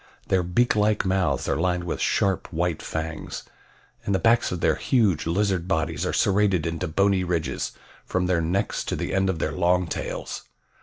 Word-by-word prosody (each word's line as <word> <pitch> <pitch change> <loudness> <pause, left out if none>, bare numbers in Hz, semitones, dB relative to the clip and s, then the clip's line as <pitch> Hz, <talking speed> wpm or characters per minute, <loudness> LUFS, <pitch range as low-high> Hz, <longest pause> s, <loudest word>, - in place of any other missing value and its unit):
Their 95 - +3
beak 90 +9 +2
like 105 -1 +2
mouths 95 -8 +1
are - - +1
lined 90 +1 0
with 85 - -3
sharp, 95 -2 +1
white 85 -1 -1
fangs, 80 0 -5 0.6
and 100 - 0
the - - +4
backs 115 +4 +3
of 90 - -3
their - - +3
huge, 105 - +1
lizard 95 0 0
bodies 80 -4 -1
are - - 0
serrated 95 -4 +2
into 80 -1 -2
bony 100 +3 +2
ridges 85 -3 -2 0.3
from 90 0 -1
their 90 -2 +1
necks 90 +5 -1
to - - -2
the - - -3
end 95 0 +2
of 95 - -1
their 80 - -1
long 90 +2 +2
tails. 80 - -4
90 Hz, 185 wpm, -25 LUFS, 85-100 Hz, 0.6 s, the